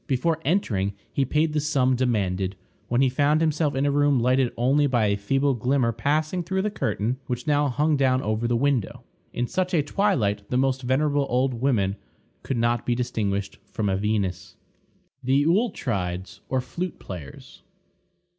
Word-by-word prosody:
Before 155 Hz, +5 st, 0 dB
entering 105 Hz, -, 0 dB, 0.2 s
he 135 Hz, -, +1 dB
paid 150 Hz, +4 st, +1 dB
the 155 Hz, -, +1 dB
sum 135 Hz, -4 st, +2 dB
demanded, 100 Hz, -6 st, 0 dB, 0.3 s
when 120 Hz, +2 st, +1 dB
he 135 Hz, -, +5 dB
found 145 Hz, +4 st, +2 dB
himself 155 Hz, -2 st, +1 dB
in 135 Hz, +1 st, +1 dB
a 145 Hz, -, +2 dB
room 145 Hz, -2 st, +3 dB
lighted 125 Hz, +1 st, +2 dB
only 135 Hz, +5 st, +3 dB
by 120 Hz, -5 st, +2 dB
a 100 Hz, -1 st, +2 dB
feeble 135 Hz, +7 st, +1 dB
glimmer 125 Hz, 0 st, +1 dB
passing 155 Hz, +9 st, 0 dB
through 190 Hz, +3 st, -1 dB
the 210 Hz, -, -1 dB
curtain, 115 Hz, -, -1 dB
which 125 Hz, -1 st, -3 dB
now 145 Hz, -1 st, +2 dB
hung 150 Hz, +4 st, +1 dB
down 130 Hz, -2 st, +3 dB
over 110 Hz, +2 st, -1 dB
the 120 Hz, -, +1 dB
window. 130 Hz, -3 st, 0 dB, 0.3 s
In 120 Hz, -, -1 dB
such 185 Hz, +7 st, -1 dB
a 150 Hz, -, +3 dB
twilight 120 Hz, -, 0 dB
the 125 Hz, -, 0 dB
most 130 Hz, 0 st, +1 dB
venerable 140 Hz, +2 st, +1 dB
old 130 Hz, +2 st, +1 dB
woman 115 Hz, -6 st, 0 dB, 0.4 s
could 130 Hz, -, -3 dB
not 120 Hz, 0 st, +1 dB
be 120 Hz, -, 0 dB
distinguished 105 Hz, -5 st, -2 dB
from 105 Hz, -3 st, -1 dB
a 95 Hz, -, +1 dB
Venus. 100 Hz, -3 st, -2 dB, 0.7 s
THE 135 Hz, +3 st, +3 dB
AULETRIDES, 115 Hz, -, -1 dB
OR 130 Hz, -1 st, +1 dB
FLUTE 170 Hz, +8 st, -5 dB
PLAYERS. 80 Hz, -8 st, -10 dB
130 Hz, 170 wpm, -25 LUFS, 110-145 Hz, 0.7 s, he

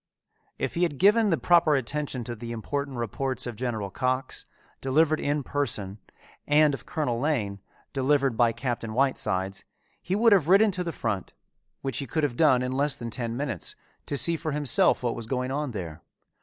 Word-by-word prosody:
If -, -, -2 dB
he 170 Hz, -, -2 dB
had 165 Hz, -5 st, +1 dB
given 210 Hz, -, +5 dB
the 165 Hz, -, +2 dB
proper 170 Hz, -4 st, +4 dB
attention 135 Hz, -1 st, -2 dB
to 120 Hz, -, -5 dB
the 115 Hz, +1 st, -7 dB
important 135 Hz, +4 st, -4 dB
reports 130 Hz, +3 st, -2 dB
of 120 Hz, -2 st, -5 dB
General 110 Hz, -4 st, -3 dB
Cox, 130 Hz, +3 st, -2 dB, 0.3 s
delivered 155 Hz, +4 st, +2 dB
in 145 Hz, 0 st, -1 dB
person, 110 Hz, -9 st, -3 dB, 0.5 s
and 150 Hz, 0 st, +5 dB
of 135 Hz, -, -7 dB
Colonel 135 Hz, -8 st, -1 dB
Lane, 115 Hz, -9 st, -1 dB, 0.3 s
delivered 135 Hz, -1 st, +2 dB
by 120 Hz, 0 st, +4 dB
Captain 115 Hz, -3 st, -4 dB
Whitesides, 95 Hz, -8 st, 0 dB, 0.4 s
he 185 Hz, -, -2 dB
would 225 Hz, +1 st, +5 dB
have 175 Hz, -7 st, +3 dB
ridden 200 Hz, +4 st, +5 dB
to 180 Hz, -1 st, -2 dB
the 170 Hz, -, -3 dB
front, 110 Hz, -, -3 dB, 0.5 s
which 135 Hz, -3 st, -2 dB
he 140 Hz, -, -4 dB
could 155 Hz, +5 st, -1 dB
have 140 Hz, -5 st, 0 dB
done 130 Hz, -4 st, +4 dB
in 125 Hz, -, -2 dB
less 140 Hz, +2 st, +1 dB
than 120 Hz, -1 st, -6 dB
ten 120 Hz, -1 st, -2 dB
minutes, 130 Hz, -, -4 dB, 0.3 s
to 140 Hz, -, -1 dB
see 170 Hz, +4 st, +5 dB
for 155 Hz, -2 st, -3 dB
himself 145 Hz, -4 st, +3 dB
what 120 Hz, -1 st, 0 dB
was 115 Hz, -2 st, -6 dB
going 125 Hz, +1 st, -2 dB
on 145 Hz, +1 st, -2 dB
there. 90 Hz, -9 st, -6 dB
135 Hz, 185 wpm, -26 LUFS, 120-150 Hz, 0.5 s, given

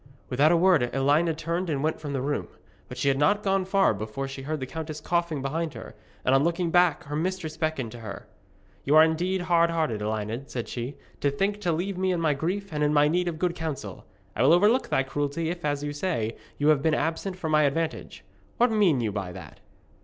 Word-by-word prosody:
Without 140 Hz, +5 st, +4 dB
a 170 Hz, -, +4 dB
word 170 Hz, -8 st, +4 dB
Elined 150 Hz, +4 st, +2 dB
turned 170 Hz, +3 st, -2 dB
and 140 Hz, -2 st, -1 dB
went 155 Hz, +1 st, 0 dB
from 145 Hz, -2 st, -6 dB
the 135 Hz, -2 st, -2 dB
room. 145 Hz, +1 st, -2 dB, 0.4 s
But 125 Hz, -, -8 dB
she 130 Hz, -, -1 dB
had 135 Hz, 0 st, +2 dB
not 200 Hz, +8 st, +3 dB
gone 195 Hz, -1 st, +1 dB
far 195 Hz, -, +3 dB
before 110 Hz, +6 st, -4 dB
she 135 Hz, 0 st, -7 dB
heard 155 Hz, +3 st, -3 dB
the 130 Hz, -, -3 dB
countess 155 Hz, +2 st, -6 dB
coughing 170 Hz, -3 st, -1 dB
behind 155 Hz, +3 st, -2 dB
her, -, -, -9 dB, 0.3 s
and 130 Hz, -, +3 dB
on 135 Hz, +1 st, +4 dB
looking 170 Hz, +1 st, 0 dB
back 175 Hz, -2 st, +3 dB
her 145 Hz, -1 st, -5 dB
mistress 165 Hz, -1 st, -2 dB
beckoned 155 Hz, -7 st, -2 dB
to 120 Hz, -, -9 dB
her. 105 Hz, -3 st, -8 dB, 0.6 s
'You 145 Hz, -, +2 dB
are 155 Hz, -, +9 dB
indeed 175 Hz, +4 st, 0 dB
hardhearted, 165 Hz, -9 st, +1 dB
Elined,' 110 Hz, +5 st, -3 dB
said 120 Hz, -2 st, -4 dB
she, 125 Hz, +3 st, -5 dB, 0.2 s
'to 140 Hz, -, +2 dB
think 200 Hz, +8 st, -1 dB
to 175 Hz, -4 st, +1 dB
leave 180 Hz, +3 st, -2 dB
me 190 Hz, 0 st, +1 dB
in 175 Hz, -, 0 dB
my 160 Hz, -3 st, +2 dB
grief, 185 Hz, +8 st, -3 dB
and 150 Hz, 0 st, 0 dB
in 150 Hz, +1 st, +2 dB
my 145 Hz, 0 st, +5 dB
need 175 Hz, +3 st, +1 dB
of 165 Hz, -2 st, -2 dB
good 175 Hz, +1 st, 0 dB
counsel. 160 Hz, -4 st, -6 dB, 0.3 s
I -, -, -1 dB
will 135 Hz, +6 st, +6 dB
overlook 210 Hz, +9 st, +3 dB
thy 135 Hz, -, +2 dB
cruelty 145 Hz, +4 st, -2 dB
if, 175 Hz, -1 st, -7 dB
as 145 Hz, -1 st, -1 dB
you 145 Hz, 0 st, -3 dB
say, 145 Hz, -9 st, -2 dB, 0.2 s
you 145 Hz, +1 st, +2 dB
have 150 Hz, -3 st, +4 dB
been 155 Hz, +1 st, +2 dB
absent 180 Hz, +3 st, -2 dB
for 165 Hz, -3 st, -4 dB
my 155 Hz, 0 st, +4 dB
advantage. 155 Hz, +3 st, -2 dB, 0.3 s
What 245 Hz, 0 st, +3 dB
mean 190 Hz, -, +3 dB
you 110 Hz, -2 st, -1 dB
by 95 Hz, -3 st, -4 dB
that?' -, -, -11 dB
155 Hz, 230 wpm, -26 LUFS, 135-175 Hz, 0.6 s, are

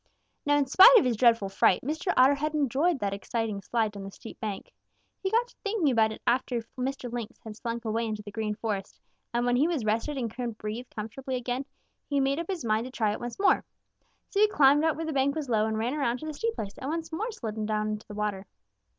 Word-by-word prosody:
"Now 290 Hz, 0 st, +4 dB
in 285 Hz, -, +2 dB
spite 385 Hz, -, +9 dB
of 405 Hz, -, +4 dB
his 245 Hz, -2 st, +1 dB
dreadful 230 Hz, -3 st, +4 dB
fright, 195 Hz, -1 st, +3 dB
Mr. 315 Hz, +7 st, -1 dB
Otter 260 Hz, +2 st, +7 dB
had 305 Hz, +2 st, -2 dB
enjoyed 295 Hz, +4 st, +2 dB
that 200 Hz, -5 st, -2 dB
exciting 210 Hz, 0 st, -3 dB
slide 220 Hz, +1 st, 0 dB
down 200 Hz, -1 st, -8 dB
the 195 Hz, -, -6 dB
steep 225 Hz, -, -11 dB
bank. 210 Hz, -4 st, -5 dB, 0.5 s
He 385 Hz, -, 0 dB
got 465 Hz, +4 st, +2 dB
to -, -, -22 dB
thinking 405 Hz, -9 st, +1 dB
about 220 Hz, -2 st, +3 dB
it 220 Hz, -, -9 dB
after 245 Hz, -1 st, +1 dB
Mr. 255 Hz, -1 st, -3 dB
Lynx 235 Hz, 0 st, -5 dB
had 220 Hz, -1 st, -8 dB
slunk 235 Hz, +1 st, -5 dB
away 225 Hz, +1 st, 0 dB
into 215 Hz, -1 st, -4 dB
the 205 Hz, -, -9 dB
Green 215 Hz, 0 st, -2 dB
Forest, 205 Hz, -3 st, -4 dB, 0.3 s
and 240 Hz, +1 st, 0 dB
when 245 Hz, 0 st, +2 dB
he 290 Hz, +5 st, +4 dB
was 315 Hz, -10 st, -1 dB
rested 230 Hz, +7 st, 0 dB
and 230 Hz, -4 st, -3 dB
could 240 Hz, -3 st, -4 dB
breathe 220 Hz, +4 st, -5 dB
comfortably 250 Hz, +5 st, -5 dB
again, 250 Hz, +2 st, -2 dB, 0.4 s
he 285 Hz, -1 st, +1 dB
made 275 Hz, +2 st, +1 dB
up 335 Hz, -, -4 dB
his 360 Hz, -9 st, -3 dB
mind 220 Hz, +1 st, +1 dB
to 255 Hz, -, -7 dB
try 220 Hz, -5 st, +1 dB
it 210 Hz, -, -4 dB
once 240 Hz, 0 st, -6 dB
more. 395 Hz, -, +3 dB, 0.7 s
So 400 Hz, -, 0 dB
he 425 Hz, -, +7 dB
climbed 290 Hz, -6 st, +5 dB
out 320 Hz, -1 st, +2 dB
where 325 Hz, -, -4 dB
the 315 Hz, -, -3 dB
bank 275 Hz, +1 st, +2 dB
was 300 Hz, -4 st, -4 dB
low 220 Hz, -2 st, +2 dB
and 220 Hz, 0 st, -1 dB
ran 235 Hz, +4 st, -1 dB
around 265 Hz, -5 st, 0 dB
to -, -, -6 dB
the 310 Hz, -, -4 dB
steep 455 Hz, +10 st, -2 dB
place 200 Hz, -1 st, -5 dB
and 265 Hz, -, -4 dB
once 325 Hz, +1 st, -3 dB
more 435 Hz, +9 st, -2 dB
slid 220 Hz, -, -5 dB
down 215 Hz, 0 st, 0 dB
into 210 Hz, 0 st, -5 dB
the 210 Hz, -, -8 dB
water. 205 Hz, -2 st, -3 dB
245 Hz, 245 wpm, -28 LUFS, 215-290 Hz, 0.7 s, spite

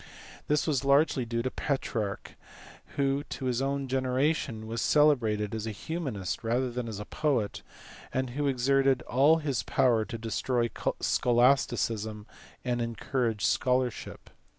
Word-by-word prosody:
This 150 Hz, -1 st, +2 dB
was 145 Hz, -5 st, 0 dB
largely 140 Hz, -2 st, +3 dB
due 115 Hz, 0 st, -2 dB
to 130 Hz, -, -2 dB
Petrarch, 110 Hz, -7 st, -3 dB, 0.6 s
who 140 Hz, 0 st, +1 dB
to 135 Hz, -, -6 dB
his 125 Hz, 0 st, 0 dB
own 140 Hz, 0 st, -1 dB
gene 130 Hz, 0 st, -1 dB
ration 130 Hz, -4 st, 0 dB
was 115 Hz, +1 st, -3 dB
celebrated 115 Hz, -9 st, +3 dB
as 110 Hz, 0 st, -3 dB
a -, -, -2 dB
humanist 110 Hz, -, -4 dB
rather 120 Hz, +3 st, 0 dB
than 120 Hz, 0 st, -4 dB
as 110 Hz, -3 st, -5 dB
a 105 Hz, -, -6 dB
poet, 130 Hz, -8 st, -1 dB, 0.5 s
and 130 Hz, -1 st, -2 dB
who 145 Hz, +3 st, -1 dB
exerted 135 Hz, 0 st, +2 dB
all 145 Hz, +6 st, +4 dB
his 140 Hz, -7 st, -1 dB
power 120 Hz, -4 st, +2 dB
to 115 Hz, -, -6 dB
destroy 115 Hz, +1 st, -1 dB, 0.3 s
scholasticism, 115 Hz, -4 st, +2 dB, 0.4 s
and 120 Hz, -1 st, 0 dB
encourage 115 Hz, -1 st, -1 dB
scholarship. 125 Hz, -2 st, -1 dB
125 Hz, 140 wpm, -29 LUFS, 115-135 Hz, 0.6 s, all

